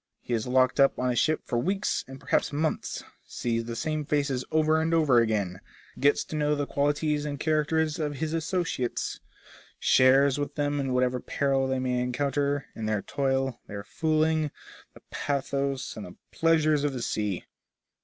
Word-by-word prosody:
He 125 - -5
is 115 +1 -1
locked 130 +2 +3
up 135 0 +5
in 125 - -1
a 125 -1 +1
ship 155 +5 +2
for 120 - -1
weeks 195 +9 0
and 135 0 -10
perhaps - - 0
months, 155 +2 -2 0.2
sees 115 -1 -2
the 115 0 -5
same 155 +4 -2
faces 140 -3 0
over 155 0 +3
and 165 +1 +1
over 145 -7 +5
again, 100 -5 0 0.4
gets 145 +1 +3
to - - -7
know 150 0 +1
the 145 0 -1
qualities 145 +1 0
and 145 -2 -4
characters 155 0 +1
of 150 -2 -2
his 155 +2 -3
associates, 165 -6 -2 0.6
shares 135 +2 +4
with 145 - -3
them 145 -1 0
in 135 -2 -1
whatever 125 0 +1
peril 135 +1 0
they 130 0 0
may 125 -1 0
encounter, 140 +3 0
in 110 -1 -4
their 105 -2 0
toil, 135 -2 -1
their 100 0 -6
fooling, 155 +3 +1 0.5
the - - -16
pathos 140 -1 -2
and 105 -3 -7
the 90 - -12 0.2
pleasures 155 -3 +3
of 145 -2 0
the 125 -3 -4
sea. 105 -6 -2
140 Hz, 175 wpm, -27 LUFS, 125-155 Hz, 0.6 s, up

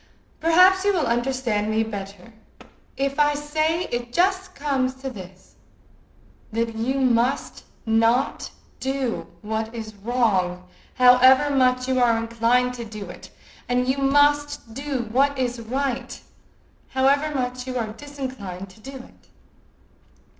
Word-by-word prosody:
"Perhaps 365 +3 +5
you 405 0 +3
will 335 -5 +1
understand 240 -3 0
me 220 +1 +1
better 200 -1 -8 0.6
if 275 +1 -1
I 295 0 +4
say 310 +3 0
it 240 0 -3
just 375 +4 +1
comes 270 -3 -1
to 265 0 -6
this, 190 -3 -13 0.9
that 230 +1 -1
you 235 +4 -1
must 255 +1 0 0.2
not 230 +4 +1 0.3
do 265 -2 -2 0.2
what 220 +2 -3
is 220 -1 -6
wrong, 195 -5 0 0.3
however 255 +3 +6
much 255 -1 +2
you 260 -1 +1
are 235 -2 +4
inclined 230 +2 +1
to 240 -1 -6
do 215 -4 -8
it, - - -12 0.4
and 250 0 +1
you 265 +2 0
must 290 -2 +2
do 270 -2 -3
what 280 +3 +2
is 245 -2 -1
right, 260 +1 -3 0.8
however 280 +3 +3
much 250 -1 -3
you 255 -1 -3
are 220 -3 -3
disinclined 245 -9 -7
to 190 - -19
do 270 +5 -10
it." 250 - -16
250 Hz, 130 wpm, -23 LUFS, 225-275 Hz, 0.9 s, however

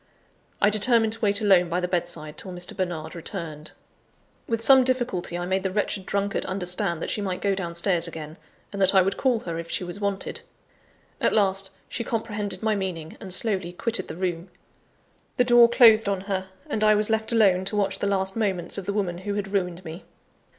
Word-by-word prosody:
I 205 - +4
determined 220 +1 +3
to 230 - -4
wait 200 -1 +1
alone 190 -4 +4
by 175 +2 0
the 180 - -1
bedside 170 -4 -3
till 185 - -8
Mr. 180 0 -4
Bernard 175 -4 -3
returned. 155 -2 -6 0.8
With 230 -1 -1
some 265 +1 +7
difficulty, 245 -9 -1
I 175 - -3
made 190 +1 0
the 190 - -1
wretched 195 0 -2
drunkard 200 0 -1
understand 180 -2 -1
that - - -3
she 210 - -1
might 190 -2 -3
go 200 -1 +1
downstairs 175 -1 0
again; 160 -1 -8 0.4
and 200 - -4
that 190 +1 +4
I 190 - +7
would 195 +2 -1
call 250 -4 +1
her 165 -1 -4
if 170 0 -7
she - - -2
was 180 +3 -6
wanted. 200 - -3 0.8
At - - +2
last, 195 -2 +3 0.2
she 235 - -4
comprehended 210 -4 -3
my 220 -1 +2
meaning, 180 -5 -4
and 190 - -8
slowly 185 -2 -1
quitted 230 +5 -3
the 160 - -7
room. 175 -1 -3 0.9
The 250 - +5
door 240 -1 +6
closed 225 -3 +6
on 195 -2 -1
her; 190 -1 -3 0.2
and 215 - -1
I 215 0 +5
was 210 +1 +1
left 220 +1 0
alone 195 -5 +4
to 210 - 0
watch 200 -1 0
the 200 - -1
last 190 -1 0
moments 195 -5 -1
of 190 - -9
the 200 - -1
woman 180 -4 -2
who 200 +2 -4
had 200 -1 -4
ruined 180 -2 -2
me! 165 +3 -8
195 Hz, 205 wpm, -25 LUFS, 175-210 Hz, 0.9 s, some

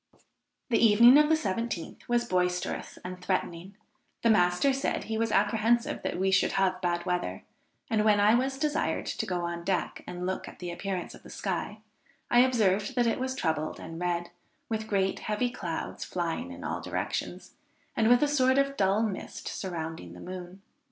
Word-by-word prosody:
"The 230 - +3
evening 235 +5 +8
of 300 0 +4
the 320 - +5
17th 225 - -3
was 240 0 +2
boisterous 180 -2 -1
and 180 0 -6
threatening; 185 0 -2 0.5
the 230 - +5
master 180 +7 +3
said 270 - -1
he 220 - -4
was 225 -1 0
apprehensive 225 +4 +2
that - - -3
we 190 +1 +1
should 190 - +3
have 185 -1 +1
bad 175 -1 -1
weather; 175 - -2 0.4
and 215 -1 +1
when 210 -1 +4
I 205 +2 +5
was 265 +3 +1
desired 300 +1 0
to - - -3
go 180 -2 -1
on 170 0 -4
deck 185 0 -2
and 180 0 -5
look 190 +1 -3
at - - -11
the 175 -1 -5
appearance 185 0 -4
of - - -13
the - - -14
sky, - - -4 0.5
I 240 - +6
observed 215 -3 +3
that 245 -1 +3
it 230 - +1
was 260 0 -2
troubled 160 - -1
and 165 0 -8
red, 175 -1 -1 0.4
with 220 -1 -2
great 195 -2 0
heavy 220 +3 -1
clouds 170 -8 -4
flying 175 +8 -3
in 265 - -9
all - - -3
directions, - - -4 0.4
and 225 0 +3
with 245 +3 +6
a - - +4
sort 260 -2 +3
of 275 0 +2
dull 195 +3 +3
mist 210 -4 -4
surrounding 160 - -5
the 90 - -11
moon. 185 - -8
195 Hz, 185 wpm, -29 LUFS, 180-235 Hz, 0.5 s, evening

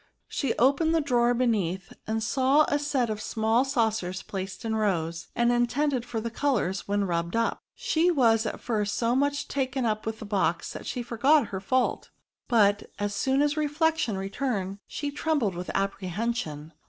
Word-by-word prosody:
She 275 -5 -2
opened 280 +6 +3
a - - +4
drawer 245 -4 +2
beneath, 195 -7 0
and 220 0 -1
saw 270 +5 +3
a 290 - +1
set 275 -6 0
of 215 0 -4
small 220 +3 +1
saucers 220 -8 -1
placed 190 +2 -6
in 220 -1 0
rows, 170 -6 -1
and 235 0 +3
intended 245 +2 +1
for 235 -2 -3
the 230 +1 -4
colours 225 -8 0
when 205 0 +1
rubbed 170 -1 -1
up. 230 0 0
She 360 -8 +1
was 230 -8 +3
at - - -4
first 210 -3 -1
so 235 +1 +1
much 285 +1 0
taken 265 -2 -1
up 215 -1 -1
with 220 0 -2
the 220 - -8
box 195 -4 0
that - - -8
she 245 - -3
forgot 245 +3 +3
her 190 - -4
fault; 255 +6 0 0.4
but, 205 -4 +3
as 205 0 -2
soon 265 +7 +2
as 295 0 +1
reflection 305 - +1
returned, 195 -1 -3
she 290 -1 -4
trembled 290 -8 0
with 180 +1 -6
apprehension. 195 -5 -2
230 Hz, 175 wpm, -27 LUFS, 200-270 Hz, 0.4 s, a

